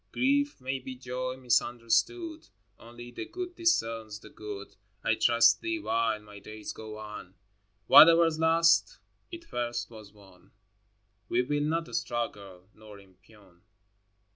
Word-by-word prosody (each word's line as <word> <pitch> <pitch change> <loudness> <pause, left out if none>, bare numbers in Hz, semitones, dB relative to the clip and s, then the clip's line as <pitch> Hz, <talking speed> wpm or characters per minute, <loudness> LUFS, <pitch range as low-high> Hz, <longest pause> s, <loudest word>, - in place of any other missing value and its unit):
Grief 285 - +1
may 130 +1 -3
be 130 0 -8
joy 130 0 -5
misunderstood: 125 - 0 0.3
Only 120 +1 -12
the - - -6
Good 360 -1 -7
discerns 115 - 0
the - - -15
good. 105 -2 -9 0.3
I - - +2
trust 115 0 +4
Thee 335 -1 -2
while 115 - -1
my 105 -1 -13
days 110 +1 -8
go 110 -1 -9
on. 105 -3 -9
XXII. 95 +2 -31 0.5
Whatever's 165 0 +7
lost, 165 - +3 0.3
it 340 -1 -9
first 120 - -4
was 110 -3 -12
won: 95 -3 -20 0.8
We 125 - +2
will 145 +3 -1
not 165 +2 -2
struggle 100 - -4
nor 105 -1 -14
impugn. 95 -1 -22
120 Hz, 135 wpm, -29 LUFS, 105-165 Hz, 0.8 s, Whatever's